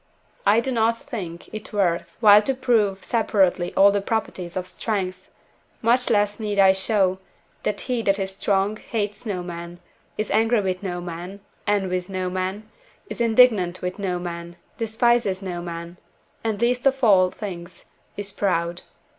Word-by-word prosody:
I 215 +3 +5
do 265 - -3
not 230 -1 +2
think 180 - -7
it 215 0 -7
worth 185 -5 0
while 210 -2 +8
to 265 +5 -1
prove 210 -7 +1
separately 195 -6 +1
all 200 +1 +7
the 200 0 0
properties 190 -5 -3
of 180 - -2
strength; 185 0 -3 0.5
much 245 +2 +3
less 205 -1 +2
need 210 -2 -2
I 190 -1 +7
show, 190 -1 +1 0.4
that - - -2
he 250 -3 -1
that 200 -3 +2
is 195 -1 -3
strong 200 +2 0
hates 210 0 -4
no 185 -4 -2
man, 170 0 -7 0.4
is 215 - -2
angry 225 +1 +3
with 185 -2 -2
no 175 -3 -4
man, 175 +3 -7 0.3
envies 190 -3 0
no 185 -1 -2
man, 190 +3 -3 0.4
is - - -4
indignant 220 -7 +4
with 180 +2 -3
no 185 -3 -1
man, 170 -1 -6 0.2
despises 225 -3 +1
no 175 -2 -4
man, 170 0 -7 0.5
and 220 -3 -1
least 245 +3 +2
of 270 -1 0
all 190 -5 +6
things 180 -3 -8 0.3
is 200 -1 -4
proud. 175 -3 -1
195 Hz, 160 wpm, -23 LUFS, 180-220 Hz, 0.5 s, while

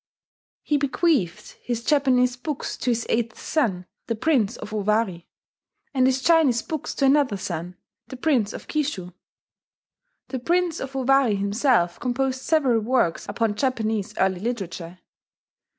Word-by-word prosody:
He 295 - +1
bequeathed 275 - 0
his 235 -1 -3
Japanese 255 -4 +3
books 280 +2 -4
to 255 - -2
his 235 -1 0
eighth 230 0 -1
son, 200 - -1 0.2
the 230 - -1
Prince 235 -4 +1
of 210 - -8
Owari; 210 -4 0 0.7
and 260 -2 +3
his 265 0 +1
Chinese 305 -9 +4
books 315 -3 -4
to 275 - +1
another 270 -6 +3
son, 175 -1 -5 0.3
the 260 - -8
Prince 250 -7 +1
of - - -9
Kishu. 270 - -2 1.2
The 260 - -3
Prince 345 +4 +1
of 270 0 -6
Owari 265 -4 +3
himself 200 -2 +1
composed 255 +1 -1
several 270 -7 +2
works 220 -7 0
upon 220 +1 0
Japanese 220 -3 -1
early 190 -1 +1
literature. 185 -6 -5
245 Hz, 135 wpm, -24 LUFS, 205-270 Hz, 1.2 s, Chinese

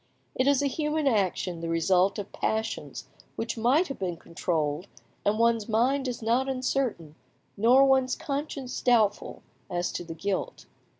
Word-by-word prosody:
It 255 - 0
is 285 0 +3
a - - +1
human 300 +2 -1
action, 190 -7 0
the 165 - -3
result 180 +3 +2
of 205 -1 -6
passions 220 +1 -3 0.3
which 225 - -3
might 255 +10 +3
have 275 - -7
been 180 -3 -3
controlled, 165 0 -2 0.4
and 205 +1 +1
one's 230 -1 +2
mind 260 +5 +2
is 240 -2 -4
not 245 +4 +1
uncertain, 255 - -2 0.4
nor 245 +6 +5
one's 265 -1 +3
conscience 275 -2 -4
doubtful, 220 -5 +1 0.3
as 175 -1 -1
to - - -4
the 165 -1 -8
guilt. 195 +3 -3
225 Hz, 155 wpm, -27 LUFS, 185-265 Hz, 0.4 s, nor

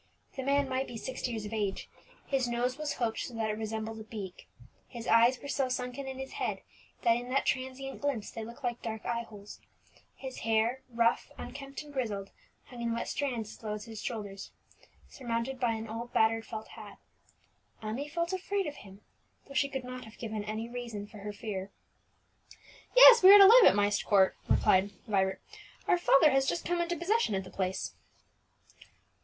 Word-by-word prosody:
The 270 - -3
man 280 +1 +2
might 265 +1 -1
be 240 - -7
sixty 255 +2 -4
years 220 -3 -4
of 210 - -6
age; 205 -3 -2 0.4
his 265 -3 0
nose 240 +1 -1
was 305 0 -3
hooked, 230 -2 -2
so 245 - -5
that 220 -1 -1
it 210 - -4
resembled 220 0 -4
a - - -7
beak; 205 -4 -8 0.4
his 235 -2 -8
eyes 235 +3 +5
were 285 - -9
so 275 -2 0
sunken 250 +2 -4
in 265 -1 -5
his 265 0 -6
head - - -3 0.4
that 230 -1 +4
in 245 +1 -6
that 270 +2 +1
transient 265 +1 -3
glimpse 275 -7 -2
they 225 - -6
looked 235 +5 -11
like 240 -1 -2
dark 220 -1 -5
eye 235 0 -1
holes; 210 -3 -11 0.6
his 265 -1 -7
hair, 225 +3 +1
rough, 235 -1 +1
unkempt, 275 +1 -7
and 295 -1 -13
grizzled, 210 -7 -3 0.3
hung 245 -2 -10
in 235 -1 -1
wet 235 - -3
strands 240 -7 -2
as - - -19
low 210 -1 -3
as 210 0 -8
his 225 -2 -8
shoulders, 205 -4 -5 0.6
surmounted 240 +1 -3
by 240 -3 +1
an 220 0 -5
old 230 +2 -6
battered 225 0 +2
felt 220 -1 -7
hat. 210 -3 -11 0.9
Emmie 240 +7 -4
felt 340 +3 -2
afraid 390 +1 -1
of 295 - -5
him, 195 0 -13 0.5
though 275 - -11
she 280 +1 +2
could 265 -2 -4
not 250 0 -7
have 220 - -14
given 215 -2 -4
any 215 +2 -4
reason 235 -4 -6
for 210 0 -13
her 210 +1 -5
fear. 200 -2 -5 1.3
"Yes, - - +10
we 380 +1 +10
are 410 - +12
to 395 - +10
live 460 +3 +9
at - - +7
Myst 205 0 +2
Court," 195 -3 +4
replied 190 +2 +4 0.2
Vibert. 190 -3 +1 0.5
"Our 355 - +3
father 300 -3 +5
has 270 0 +2
just 340 - -2
come 350 0 0
into 345 0 -1
possession 365 - +1
of 190 - -2
the 185 - -12
place." 190 -1 -2
235 Hz, 195 wpm, -30 LUFS, 215-270 Hz, 1.3 s, are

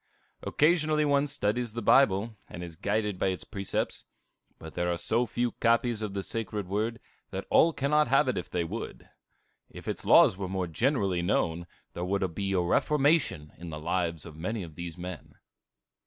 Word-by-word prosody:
Occasionally 155 -1 +2
one 145 0 +2
studies 120 -4 -1
the 115 - -3
Bible, 110 -3 +4
and 90 - -7
is 85 -2 -8
guided 105 +1 -1
by - - +2
its 95 -1 -2
precepts; 100 -3 -3 0.5
but 80 -1 -10
there 90 0 0
are 85 - -1
so 115 +9 +1
few 120 +2 -1
copies 115 -1 +1
of 105 -2 -4
the 100 - -2
sacred 105 -3 -4
Word, 110 +4 -1 0.3
that - - -5
all 165 - +6
cannot 150 0 +2
have 135 +2 +4
it 130 - +1
if 90 - -4
they 85 - -1
would. 100 +8 -6 0.6
If - - -11
its - - -3
laws 90 - +6
were 95 -2 -4
more 95 -1 -1
generally 100 - 0
known, 85 -2 0 0.3
there 85 - -4
would 95 -1 -1
be 100 +3 -2
a 95 -2 +2
reformation 140 - +2
in 85 0 -7
the 75 -1 -6
lives 85 0 -2
of 80 -3 -10
many 100 +6 -3
of 80 -2 -10
these 85 +1 -7
men. 90 -1 -8
100 Hz, 185 wpm, -29 LUFS, 90-120 Hz, 0.6 s, all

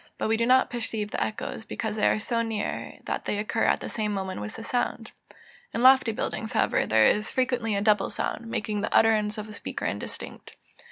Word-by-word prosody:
But - - -1
we 225 - +3
do 230 +1 +1
not 260 +1 +4
perceive 220 -3 -3
the - - 0
echoes, 220 +1 -4
because 220 -1 -4
they 215 - +2
are - - +3
so 230 +2 -1
near 220 -2 -3
that - - -3
they 210 - -1
occur 220 +2 0
at - - +2
the - - -4
same 215 -2 -2
moment 190 - -3
with 105 - -6
the 225 - -7
sound. 245 +2 -2 0.6
In 235 - 0
lofty 260 -2 +7
buildings, 220 +1 -3
however, - - +2
there 110 0 +5
is 210 +1 +2
frequently 245 -4 0
a 200 - 0
double 210 -1 +3
sound, 230 - -3
making 210 -2 -2
the 215 - -2
utterance 215 -1 +3
of 215 0 -5
a 215 - -10
speaker - - -5
indistinct. - - -6
220 Hz, 215 wpm, -27 LUFS, 210-230 Hz, 0.6 s, lofty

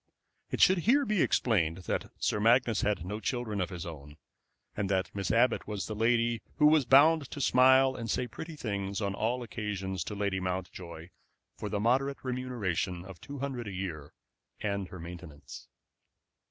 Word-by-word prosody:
It - - -2
should 190 0 +6
be - - -1
here 275 - +3 0.2
explained 85 -9 +1
that - - -2
Sir - - 0
Magnus 115 +1 +3
had 100 -5 0
no 105 +3 -4
children 110 -2 -2
of 90 - -1
his 90 -3 -6
own, 75 -3 -9 0.6
and 100 -2 -2
that 95 -1 0
Miss 100 -3 -3
Abbott 115 +2 +2
was 105 -2 -3
the 110 - -5
lady 115 +1 +1
who 150 - +3
was 150 -2 +5
bound 145 +1 +6
to 145 - -7
smile 130 0 +5
and 115 -1 -5
say 125 - 0
pretty 160 +7 -8
things 100 -7 -3
on 100 -2 -1
all 120 +5 -1
occasions 95 -5 -4
to 105 - -5
Lady 100 -1 -1
Mountjoy 90 -2 -5 0.5
for 105 - -5
the 105 - -1
moderate 135 +5 +1
remuneration 110 -9 -2
of 95 -4 -11
two 145 - -8
hundred 130 -4 -4
a - - -5
year 85 -6 -5 0.5
and 100 -2 -2
her 95 - -10
maintenance. 85 -3 -10
105 Hz, 175 wpm, -30 LUFS, 95-125 Hz, 0.6 s, should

